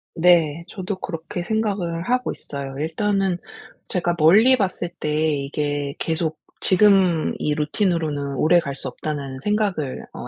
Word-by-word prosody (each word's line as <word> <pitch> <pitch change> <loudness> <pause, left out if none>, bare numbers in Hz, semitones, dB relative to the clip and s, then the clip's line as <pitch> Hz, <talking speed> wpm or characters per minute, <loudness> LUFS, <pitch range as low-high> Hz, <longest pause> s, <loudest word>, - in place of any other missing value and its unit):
네, 170 -2 +3
저도 190 0 -5
그렇게 165 -1 -5
생각을 195 -5 -1
하고 250 +4 0
있어요. 135 -1 -7
일단은 190 +4 0 0.5
제가 175 -1 0
멀리 215 +12 +6
봤을 190 -4 -1
때 150 - -2 0.2
이게 145 0 -2
계속 160 -1 -1 0.2
'지금 185 -4 +4
이 150 - 0
루틴으로는 150 -3 -1
오래 160 +6 +4
갈 140 -4 -4
수 135 - -4
없다.'는 140 -2 -5
생각을 200 -7 -1
어 - - -7
170 Hz, 275 characters per minute, -22 LUFS, 150-195 Hz, 0.5 s, 멀리